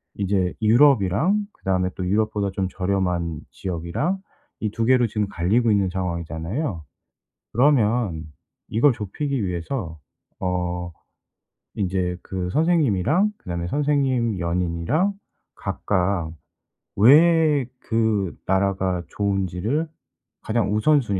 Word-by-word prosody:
이제 95 -2 0
유럽이랑 130 - +4
그다음에 90 -1 -1
또 95 - -3
유럽보다 105 0 0
좀 95 0 -1
저렴한 90 -4 -1
지역이랑 90 - -2 0.4
이 110 - -1
2 115 +2 -1
개로 125 -1 +4
지금 105 -1 -1
갈리고 105 +6 +1
있는 100 -2 +2
상황이잖아요. 85 - -3 0.7
그러면 115 - +2 0.4
이걸 125 +6 +4
좁히기 120 +3 -3
위해서 85 - -4 0.4
어 90 -1 -2 0.8
인제 90 -2 -1
그 90 -1 -4
선생님이랑 160 - +2
그다음에 85 -1 -4
선생님 130 -4 +1
연인이랑 90 - 0 0.4
각각 90 -4 -1 0.6
왜 150 - +5 0.2
그 110 -5 0
나라가 95 -2 0
좋은지를 100 - -1 0.5
가장 110 -2 0
우선 145 +8 +4
순위 100 -6 -2
100 Hz, 245 characters per minute, -23 LUFS, 90-125 Hz, 0.8 s, 왜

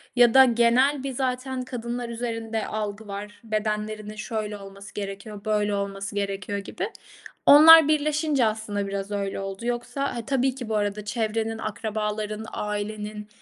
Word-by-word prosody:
ya 240 -2 +6
da 265 0 +9
genel 250 +4 +3
bir 275 - -2
zaten 255 0 -2
kadınlar 240 -1 -4
üzerinde 230 -1 -3
algı 215 0 -4
var, 205 +1 -7
bedenlerinin 215 -1 -3
şöyle 215 -1 -4
olması 195 0 -11
gerekiyor, 200 +1 -6
böyle 210 -1 +1
olması 200 0 -4
gerekiyor 200 0 -2
gibi. 200 - -4 0.6
Onlar 315 +1 +10
birleşince 300 -3 +2
aslında 215 -2 -2
biraz 195 +1 -4
öyle 200 -1 -2
oldu 195 +3 -6
yoksa 245 +3 -2
ha, 235 -2 -5
tabii 265 -1 +1
ki, 245 -4 -7
bu 220 - 0
arada, 205 0 -1
çevrenin, 225 0 -1
akrabaların, 215 0 -3
ailenin, 210 0 -4
215 Hz, 145 wpm, -25 LUFS, 205-245 Hz, 0.6 s, Onlar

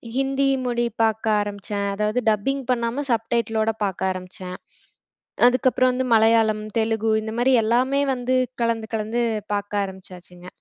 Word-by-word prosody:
ஹிந்தி 270 +1 +1 0.2
மொழி 240 -1 0 0.2
பாக்க 220 0 0 0.2
ஆரம்பிச்சேன். 205 0 -4
அதாவது 210 +3 0
டப்பிங் 265 +6 0
பண்ணாம 240 +3 -1
சப்டைட்டிலோட 225 -1 0
பாக்க 195 -3 -3
ஆரம்பிச்சேன். 185 0 -7 0.9
அதுக்கப்புறம் 255 0 +3
வந்து 255 +1 -1
மலையாளம், 220 -1 +3
தெலுகு 220 0 +1
இந்தமாரி 235 +4 0
எல்லாமே 255 +5 +2
வந்து 250 0 -2 0.3
கலந்து, 230 -1 0
கலந்து 220 +2 -1 0.3
பார்க்க 205 0 -1
ஆரம்பிச்சாச்சுங்க. 180 -2 -11
225 Hz, 120 wpm, -23 LUFS, 205-245 Hz, 0.9 s, அதுக்கப்புறம்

